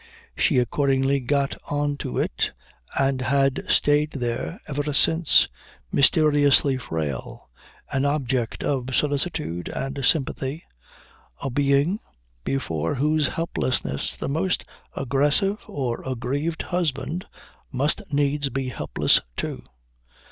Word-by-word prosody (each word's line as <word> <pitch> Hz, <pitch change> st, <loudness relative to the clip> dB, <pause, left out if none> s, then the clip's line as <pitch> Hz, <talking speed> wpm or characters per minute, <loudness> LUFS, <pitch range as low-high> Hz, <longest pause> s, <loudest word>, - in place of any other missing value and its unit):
She 150 Hz, -, +2 dB
accordingly 135 Hz, +2 st, +2 dB
got 140 Hz, +2 st, 0 dB
on 145 Hz, 0 st, 0 dB
to -, -, -4 dB
it -, -, 0 dB, 0.4 s
and 135 Hz, -1 st, +2 dB
had 135 Hz, +1 st, +2 dB
stayed 150 Hz, +1 st, +3 dB
there 120 Hz, -, -3 dB
ever 145 Hz, +1 st, -2 dB
since, 160 Hz, +3 st, +5 dB, 0.4 s
mysteriously 145 Hz, -2 st, +4 dB
frail, 75 Hz, -, -5 dB, 0.4 s
an 135 Hz, -1 st, +1 dB
object 135 Hz, -5 st, 0 dB
of 130 Hz, -2 st, -1 dB
solicitude 140 Hz, -, -1 dB
and 135 Hz, +1 st, -4 dB
sympathy, 140 Hz, +2 st, 0 dB, 0.8 s
a 135 Hz, -, -3 dB
being 140 Hz, -, +2 dB, 0.4 s
before 80 Hz, -, -1 dB
whose 150 Hz, +2 st, +2 dB
helplessness 130 Hz, -, -1 dB
the -, -, -3 dB
most 165 Hz, +6 st, 0 dB, 0.3 s
aggressive 145 Hz, -, +2 dB
or 125 Hz, -4 st, -3 dB
aggrieved 140 Hz, +6 st, -2 dB
husband 170 Hz, 0 st, -2 dB, 0.5 s
must 140 Hz, +3 st, +1 dB
needs 145 Hz, 0 st, +1 dB
be 135 Hz, 0 st, -2 dB
helpless, 75 Hz, -11 st, +2 dB, 0.2 s
too. -, -, -3 dB
140 Hz, 105 wpm, -24 LUFS, 130-150 Hz, 0.8 s, since